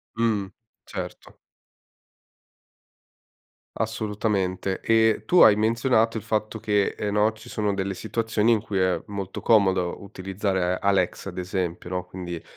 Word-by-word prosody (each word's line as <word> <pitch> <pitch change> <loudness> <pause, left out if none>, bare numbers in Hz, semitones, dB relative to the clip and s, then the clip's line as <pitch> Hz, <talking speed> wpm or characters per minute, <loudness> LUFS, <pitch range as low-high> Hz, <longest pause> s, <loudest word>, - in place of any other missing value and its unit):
Mh. 110 -4 +1 0.4
Certo. - - -8 2.4
Assolutamente, 105 -4 -1
e 110 -1 +3
tu 180 - +5
hai 105 - +8
menzionato 115 +1 +2
il 110 - -5
fatto 110 0 -2
che, 105 -2 +1
ehm, 105 -1 -2
no, 105 +1 +3
ci 110 - -15
sono 105 -2 -1
delle 95 0 -2
situazioni 115 +2 0
in 110 - +2
cui 100 -2 -3
è 95 -1 +2
molto 100 -2 -5
comodo 95 -5 +2
utilizzare 95 -1 -2
Alexa, 100 -1 0
ad 90 - -11
esempio, 90 -1 -3
no? 90 -1 -2
Quindi, 90 -3 -7
100 Hz, 130 wpm, -25 LUFS, 95-110 Hz, 2.4 s, hai